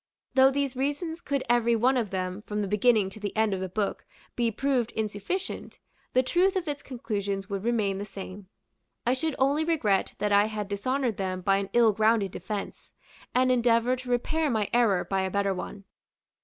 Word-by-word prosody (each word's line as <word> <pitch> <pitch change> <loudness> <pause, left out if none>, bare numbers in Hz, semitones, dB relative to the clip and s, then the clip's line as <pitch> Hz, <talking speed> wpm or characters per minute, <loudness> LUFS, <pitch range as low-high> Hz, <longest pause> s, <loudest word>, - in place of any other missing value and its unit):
Though 265 0 +6
these 275 -1 -1
reasons 290 +5 -2
could 275 -1 -1
every 235 0 +3
one 250 +4 +3
of 235 -5 0
them, 185 +1 -3
from 210 0 -1
the - - -2
beginning 210 -1 +3
to 215 - -10
the 205 0 -5
end 220 -2 +3
of 190 - -2
the 190 0 -3
book, 200 +2 -2 0.3
be 235 -1 +1
proved 245 0 0
insufficient, 220 - -4 0.3
the 255 - +4
truth 360 +8 +2
of 365 -3 -1
its 285 -1 -3
conclusions 200 -6 -4
would 195 -1 -3
remain 215 -5 0
the 205 - -4
same. 195 -1 -9 0.6
I 245 - +3
should 290 +3 -1
only 280 +4 +2
regret 265 - +1
that 205 +1 -1
I 205 0 +5
had 210 -2 -4
dishonored 245 +3 -1
them 185 -1 -2
by 195 +1 +3
an 200 0 -3
ill 235 -2 +5
grounded 215 -2 +2
defence; 200 +3 -6 0.4
and 255 0 +4
endeavor 240 0 +3
to 255 0 -9
repair 305 +6 +1
my 215 -5 0
error 225 -6 +3
by 195 -1 0
a 190 - -1
better 200 0 +1
one. 195 +2 -7
220 Hz, 195 wpm, -27 LUFS, 200-260 Hz, 0.6 s, Though